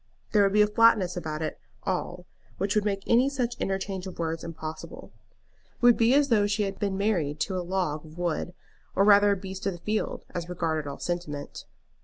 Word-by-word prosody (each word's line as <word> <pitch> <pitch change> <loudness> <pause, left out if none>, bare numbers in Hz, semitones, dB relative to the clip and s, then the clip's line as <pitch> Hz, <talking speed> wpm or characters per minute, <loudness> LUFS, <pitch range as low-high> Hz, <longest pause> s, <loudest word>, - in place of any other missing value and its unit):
There 210 - +4
would 195 -1 +3
be 210 0 +6
a - - +2
flatness 210 -4 +4
about 160 -3 -4
it - - -4 0.2
all 180 -1 -3 0.3
which 195 +2 0
would 210 -1 +1
make 195 -2 -1
any 250 +4 +4
such 250 -4 -2
interchange 195 -1 -2
of 185 - -8
words 165 -1 -2
impossible. 160 -1 -7 0.7
It - - -33
would 240 -1 +7
be 235 +3 +4
as 285 0 +4
though 210 -4 +4
she 210 +1 0
had 195 -1 -4
been 200 -2 -1
married 175 -8 0
to 190 - -1
a - - -1
log 175 -4 -2
of 155 +1 -14
wood, 175 0 -2 0.4
or 195 - +4
rather 205 0 +7
a 200 - +2
beast 190 0 -6
of 195 - 0
the - - -8
field, 215 +4 -2
as 175 -1 -4
regarded 160 -4 -2
all 140 - -6
sentiment. 170 -5 -5
190 Hz, 210 wpm, -27 LUFS, 170-210 Hz, 0.7 s, would